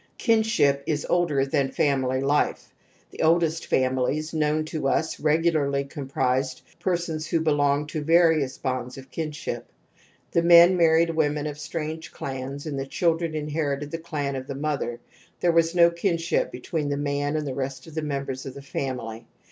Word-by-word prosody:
Kinship 220 - +2
is 150 -2 -1
older 155 -6 +2
than 135 0 0
family 130 -2 +1
life; 145 +2 0 0.4
the - - -7
oldest 165 0 +2
families 130 +5 0
known 155 0 +1
to 155 -3 -2
us 160 +3 0
regularly 150 -3 +2
comprised 130 -2 -2 0.2
persons 170 -4 -2
who 165 - +1
belonged 145 -2 +1
to 155 - -3
various 160 -4 +3
bonds 130 -1 -3
of 135 0 -12
kin 160 -2 -3
ship. 145 -5 -5 0.6
The 170 - +3
men 170 +1 +8
married 165 -1 +4
women 150 -2 0
of 150 -1 -5
strange 160 +1 -5
clans 135 +2 -6
and 145 -3 -3
the 135 - -4
children 165 +1 0
inherited 150 -1 -2
the 165 - -3
clan 150 -5 -3
of 130 0 -5
the 140 - -5
mother; 140 -4 -2 0.4
there 175 - +3
was 165 +1 +2
no 170 -1 +6
kinship 170 -1 0
between 145 +4 -3
the 140 - -1
man 145 +1 -1
and 155 -1 -1
the 135 - -3
rest 130 -1 -4
of 160 - -12
the 160 - -2
members 140 -3 -4
of 135 - -7
the 140 - -8
family. 125 -5 -5
150 Hz, 170 wpm, -25 LUFS, 135-165 Hz, 0.6 s, men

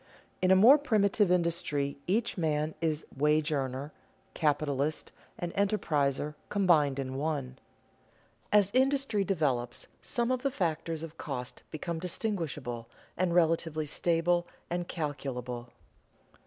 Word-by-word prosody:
_ - - -28 0.4
In 185 - +3
a 190 - +7
more 240 +10 +8
primitive 210 -7 +2
industry 165 -5 0
each 225 +6 +1
man 155 -2 0
is 160 -2 0
wage 150 +2 +2
earner, 135 0 -2 0.4
capitalist, 150 -1 0 0.3
and 175 -1 -4
enterpriser 150 -8 +1 0.2
combined 160 -9 +3
in 130 -1 -3
one. 140 -4 -2 0.9
As 205 -2 +5
industry 265 -5 +2
develops, 140 -10 -1 0.2
some 240 +1 -1
of 255 -1 0
the 275 - +1
factors 165 - -2
of 165 0 -9
cost 125 -4 -5
become 165 +1 -4
distinguishable, 155 - -3 0.3
and 175 -1 0
relatively 165 -2 +2
stable 175 +3 +1 0.2
and 175 0 -2
calculable. 125 -6 -4
160 Hz, 120 wpm, -30 LUFS, 145-185 Hz, 0.9 s, more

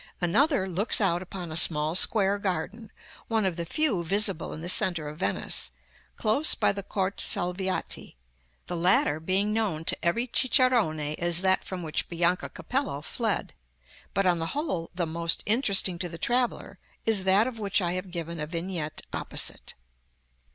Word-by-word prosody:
Another 220 - +2
looks 190 +4 +1
out 175 -4 +1
upon 180 -2 -7
a - - -5
small 155 -1 +4
square 200 +2 +3
garden, 205 +3 -4 0.4
one 220 -3 +1
of 185 -3 0
the 170 -1 -5
few 245 - +1
visible 195 +1 -1
in 155 - -7
the 170 - -5
centre 175 -4 +3
of 150 +1 -8
Venice, 95 -9 -1 0.5
close 250 +9 +2
by - - +2
the 200 - -4
Corte 195 0 -3
Salviati 185 - -1 0.5
(the - - -4
latter 170 -3 +3
being 190 +6 0
known 195 -8 -1
to - - +1
every 200 +9 +1
cicerone 250 -10 +3
as 165 +4 +1
that 190 0 +2
from 185 -2 -6
which 155 -2 -2
Bianca 175 +2 0
Capello 255 - -3
fled). 225 +4 -2 0.6
But, 195 +1 +2
on 175 -2 +3
the 165 - -2
whole, 235 - -2
the 175 -1 0
most 165 +1 0
interesting 200 -6 +2
to 175 - -3
the 165 - -8
traveller 245 +7 -1 0.3
is 215 -4 +2
that 195 +3 +4
of 245 -3 -5
which 200 -2 +2
I 175 -3 -1
have 185 +1 -4
given 170 -1 -5
a 150 - -3
vignette 165 -2 -4
opposite. - - -2
185 Hz, 165 wpm, -27 LUFS, 170-210 Hz, 0.6 s, small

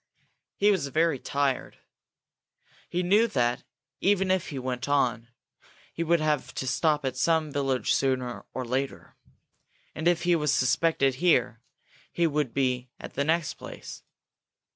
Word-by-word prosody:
He 205 +1 +4
was 175 -8 0
very 160 0 +1
tired. 140 -1 -1 1.1
He 180 +1 -1
knew 205 +6 +4
that, 120 - 0 0.4
even 195 -1 +2
if 185 -2 0
he 140 - -6
went 130 +1 -3
on, 125 -5 +1 0.7
he - - -4
would 170 +1 +3
have 150 -3 -1
to - - -3
stop 150 +2 +1
at 130 - -2
some 155 +3 +1
village 135 -2 0
sooner 130 -2 -1
or 130 - -4
later. 130 +3 -3 0.8
And 160 - -2
if 175 -1 +2
he 175 0 +3
was 150 -3 +1
suspected 135 0 +2
here, 125 -9 +2 0.5
he 170 - +1
would 150 -5 0
be 125 -1 -1
at - - -9
the 140 - 0
next 160 +2 0
place. - - -9
145 Hz, 145 wpm, -27 LUFS, 130-170 Hz, 1.1 s, He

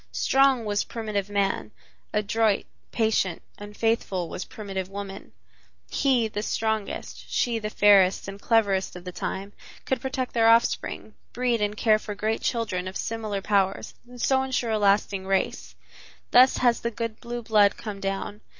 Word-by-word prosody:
Strong 270 -3 +3
was 205 0 0
primitive 215 -4 -3
man; 200 -1 0 0.4
adroit, 210 0 +1 0.3
patient 220 -6 +1 0.2
and 205 0 -10
faithful 210 -6 0
was 180 - -5
primitive 195 -3 -6
woman; 195 0 -7 0.6
he, 255 -5 +2
the 210 -1 -4
strongest, 220 -1 -3
she, 235 -2 +1
the 215 -1 -4
fairest 200 -3 +4
and 195 +1 -8
cleverest 200 -6 +1
of 180 - -9
the 180 - -6
time, 195 +3 -5 0.3
could 265 - -1
protect 265 -1 -3
their 225 -1 +4
offspring, 230 -1 +1 0.2
breed 245 -2 0
and 210 0 -1
care 215 -1 +4
for 210 -1 -6
great 215 +2 -1
children 205 -6 -1
of 190 - -5
similar 215 -3 -3
powers 195 -2 0 0.2
and 245 0 -12
so 265 +2 +2
insure 255 -3 -1
a 215 - +1
lasting 200 -1 +2
race. 195 -1 -1 0.6
Thus 255 +2 +6
has 240 -2 +3
the 235 - -1
good 230 -1 -5
blue 240 0 -6
blood 210 -2 +4
come 210 -3 -6
down. 195 +2 -4
215 Hz, 160 wpm, -25 LUFS, 200-230 Hz, 0.6 s, Thus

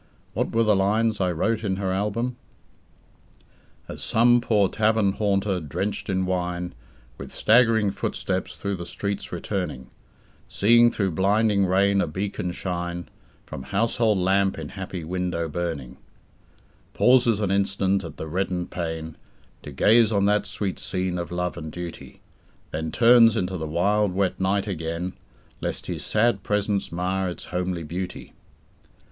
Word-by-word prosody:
What - - -1
were 115 0 +3
the 105 -2 +4
lines 105 +2 +1
I 90 -1 +2
wrote 110 +7 0
in 95 -3 0
her 95 -1 -2
album? 105 +6 -1 1.5
"As - - -7
some 120 +2 +4
poor 105 -4 +3
tavern 110 -1 +2
haunter 100 -2 0
drenched 95 +8 -4
in 95 -1 0
wine 90 -1 -2 0.5
With - - -7
staggering 110 -3 +4
footsteps 95 -1 -3
through 100 -1 -3
the 85 -1 -7
streets 100 0 -4
returning, 85 -8 -4 0.6
Seeing 120 +3 +5
through 100 -5 -1
blinding 100 +3 +2
rain 100 +2 +3
a - - 0
beacon 95 +1 -3
shine 85 -1 -4 0.4
From 65 - -7
household 110 - +1
lamp 95 +1 +2
in 80 -2 -6
happy 95 -2 -6
window 90 0 -2
burning, 80 -5 -4 1.0
"Pauses 125 -4 +4
an 100 -3 0
instant 100 0 +1
at 80 -3 -8
the - - -5
reddened 90 +2 -2
pane 80 -2 -4 0.4
To 75 - -9
gaze 110 - +4
on 100 -2 +2
that 105 0 +2
sweet 100 0 -3
scene 90 -1 -2
of 85 -2 -4
love 90 0 -2
and 80 0 -6
duty, 90 0 -8 0.5
Then 80 0 -3
turns 115 -2 +6
into 95 0 -1
the 80 -3 -4
wild 100 +5 +1
wet 95 -1 0
night 95 +1 +1
again, 85 -1 -3 0.5
Lest - - -3
his - - -4
sad 110 -2 +2
presence 105 0 -1
mar 90 +2 -1
its 90 - -7
homely 90 -1 -2
beauty." 90 +4 -6
95 Hz, 145 wpm, -24 LUFS, 90-105 Hz, 1.5 s, turns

